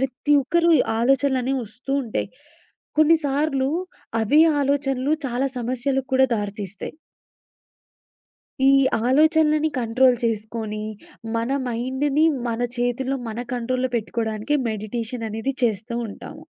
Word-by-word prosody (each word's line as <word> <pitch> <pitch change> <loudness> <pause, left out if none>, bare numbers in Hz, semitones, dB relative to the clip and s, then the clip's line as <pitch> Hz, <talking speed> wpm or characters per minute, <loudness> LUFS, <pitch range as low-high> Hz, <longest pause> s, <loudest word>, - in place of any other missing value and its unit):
ప్రతి 265 +2 -1
ఒక్కరికి 335 +2 +3 0.2
ఆలోచనలు 270 +2 +2
అనేవి 265 +1 -1
వస్తూ 245 +6 -7
ఉంటాయి. 215 -3 -3 0.7
కొన్ని 310 +2 +6
సార్లు 275 -1 0 0.5
అవి 290 +9 +4 0.2
ఆలోచనలు 275 0 0
చాలా 250 +2 -1
సమస్యలకు 255 +2 -1
కూడా 265 0 +5
దారితీస్తాయి. 205 -2 -5 1.7
ఈ 275 - +7 0.3
ఆలోచనలని 310 +2 +3
కంట్రోల్ 250 +2 +3
చేసుకొని, 215 -1 -3 0.5
మన 230 +2 -1 0.2
మైండ్‌ని 265 +6 +1 0.2
మన 230 0 -2 0.2
చేతుల్లో, 260 +2 -1
మన 220 - -5 0.2
కంట్రోల్‌లో 255 +1 -1
పెట్టుకోడానికే 220 +4 -2
మెడిటేషన్ 225 +2 -4
అనేది 225 +6 -2
చేస్తూ 225 0 0
ఉంటాము. - - -10
255 Hz, 105 wpm, -23 LUFS, 225-275 Hz, 1.7 s, ఈ